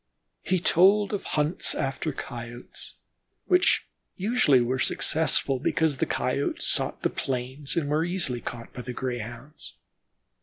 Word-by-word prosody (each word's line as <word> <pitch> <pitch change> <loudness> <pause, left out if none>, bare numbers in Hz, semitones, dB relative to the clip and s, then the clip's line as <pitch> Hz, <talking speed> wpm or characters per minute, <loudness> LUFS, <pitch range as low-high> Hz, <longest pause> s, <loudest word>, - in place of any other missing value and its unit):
He 185 0 +1
told 195 +5 +4
of 200 - -2
hunts 150 +4 +2
after 140 +2 -2
Coyotes, 120 -3 -8 0.5
which 360 -1 +3 0.3
usually 195 - +3
were 125 +2 0
successful 140 -2 +2
because 155 +1 +1
the - - 0
Coyotes - - -1
sought - - +1
the - - +3
plains, 130 +2 -1
and 155 -4 +1
were 150 +2 +1
easily 170 -9 0
caught 115 -1 -7
by 125 - -6
the 125 +1 -6
Greyhounds. 120 - -6
140 Hz, 130 wpm, -26 LUFS, 125-170 Hz, 0.5 s, told